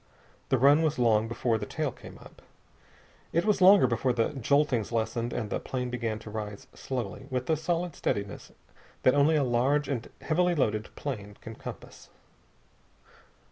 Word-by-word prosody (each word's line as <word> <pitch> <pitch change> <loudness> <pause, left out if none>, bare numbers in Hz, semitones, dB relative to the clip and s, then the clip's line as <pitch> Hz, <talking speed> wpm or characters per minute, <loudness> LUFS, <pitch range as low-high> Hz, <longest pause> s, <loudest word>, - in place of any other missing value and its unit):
The 130 - +3
run 140 +5 +5
was 155 -2 0
long 115 -3 +3
before 115 -1 0
the 105 - -5
tail 150 -3 -2
came - - -13
up. - - -16 0.9
It 170 +3 +1
was 210 -3 +2
longer 190 -3 +8
before 125 +1 +1
the 115 -1 +1
joltings 135 -3 +1
lessened 115 +1 -1
and 110 -3 -4
the - - -1
plane 125 -1 -4
began 115 -3 -2
to 105 - -8
rise 105 -2 -6
slowly, 125 0 -5
with 130 -2 -2
the 160 - +2
solid 170 +1 -2
steadiness 100 0 -3 0.5
that 130 - +5
only 145 +3 +4
a 150 - +3
large 130 +4 +1
and 125 -5 -3
heavily 175 +2 +1
loaded 110 -7 0
plane 105 -8 -6
can 115 - -8
compass. - - -10
125 Hz, 165 wpm, -28 LUFS, 110-150 Hz, 0.9 s, longer